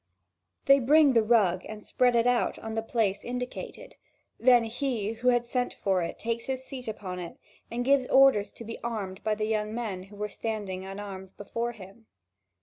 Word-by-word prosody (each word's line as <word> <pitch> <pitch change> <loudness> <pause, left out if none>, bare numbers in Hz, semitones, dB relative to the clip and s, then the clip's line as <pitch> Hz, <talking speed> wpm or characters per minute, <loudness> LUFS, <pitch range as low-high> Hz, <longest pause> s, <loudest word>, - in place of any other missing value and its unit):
They 275 0 +7
bring 285 +2 +5
the 230 - +5
rug 210 -5 +3
and 215 -1 -8
spread 245 -1 +2
it 230 0 +3
out 245 -1 +2
in 220 0 -6
the 225 - -1
place 220 -3 0
indicated; 250 +1 -6 0.5
then 245 -1 +6
he 225 -2 -2
who 245 +2 -4
had 240 -1 +4
sent 245 +1 -2
for 190 -2 0
it 170 - -4
takes 230 0 -3
his 260 -1 -3
seat 260 -2 -8
upon 190 -4 -5
it 170 -2 -7 0.3
and 240 +1 -3
gives 275 -1 +3
orders 265 -7 +5
to - - -10
be 230 +1 -7
armed 205 -5 -4
by 215 -1 +1
the 215 0 -2
young 215 0 -1
men 215 -6 -3
who 195 +2 -13
were 210 +1 -3
standing 205 -4 -4
unarmed 195 -1 -8
before 230 +4 -3
him. 210 +1 -14
225 Hz, 190 wpm, -28 LUFS, 200-245 Hz, 0.5 s, They